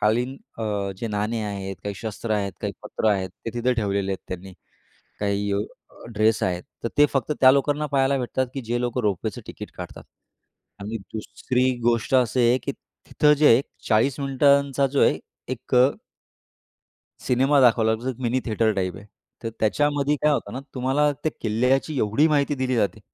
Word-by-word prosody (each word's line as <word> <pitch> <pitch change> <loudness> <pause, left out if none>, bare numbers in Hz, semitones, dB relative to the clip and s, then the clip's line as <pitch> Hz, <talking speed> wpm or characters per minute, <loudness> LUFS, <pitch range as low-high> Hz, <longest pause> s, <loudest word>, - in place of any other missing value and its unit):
कालीन 120 +5 +1 0.2
अ, 115 - -2 0.3
जे 115 - -4
नाणे 105 +2 -1
आहेत, 95 -2 -5
काही 100 - -3
शस्त्र 110 +2 -6
आहेत, 100 -2 -1
काही - - -2
पत्र 110 - -1
आहेत, 95 -3 -1
ते 115 - -3
तिथं 120 +1 +1
ठेवलेले 100 -3 0
आहेत 95 - -7
त्यांनी. 90 +1 -7 0.7
काही 100 0 0
अ, 100 - +1 0.5
ड्रेस 110 +1 +2
आहेत 90 -1 0 0.2
तर - - +1
ते 145 - +8
फक्त 135 +1 0
त्या 130 - +8
लोकांना 145 +2 +1
पाहायला 135 0 +2
भेटतात, 130 +1 -1
की 135 - -3
जे 120 +1 -2
लोकं 125 0 -1
रोपवेचं 100 -5 -2
तिकीट - - -8
काढतात. - - -8 0.8
आणि 105 +3 -4 0.2
दुसरी 125 +4 -1
गोष्ट 120 +3 +1
अशी 125 -1 +3
आहे 125 - +3
की - - -3
तिथं 150 0 0
जे 155 - +6
आहे 115 +3 +6 0.3
40 120 +5 +2
मिनिटांचा 140 0 +3
जे 135 +1 0
आहे - - +2 0.3
एक 125 +1 -5
अ 125 +1 +7 1.3
सिनेमा 135 +3 +3
दाखवला 115 -3 +4
जातो. 125 +3 -4
मिनी 125 +2 +1
थिएटर 110 -1 +1
टाइप 95 -2 -2
आहे. 100 - -12 0.4
तर 115 - -3
त्याच्यामध्ये 145 +5 +2
काय 150 - +4
होतं 145 - -2
ना, 130 - -4
तुम्हाला 135 +3 +2
त्या 155 - +1
किल्ल्याची 125 +7 +1
एवढी 110 +9 +3
माहिती 145 -1 +2
दिली 130 -1 -1
जाते. 110 0 0
120 Hz, 175 wpm, -24 LUFS, 105-135 Hz, 1.3 s, ते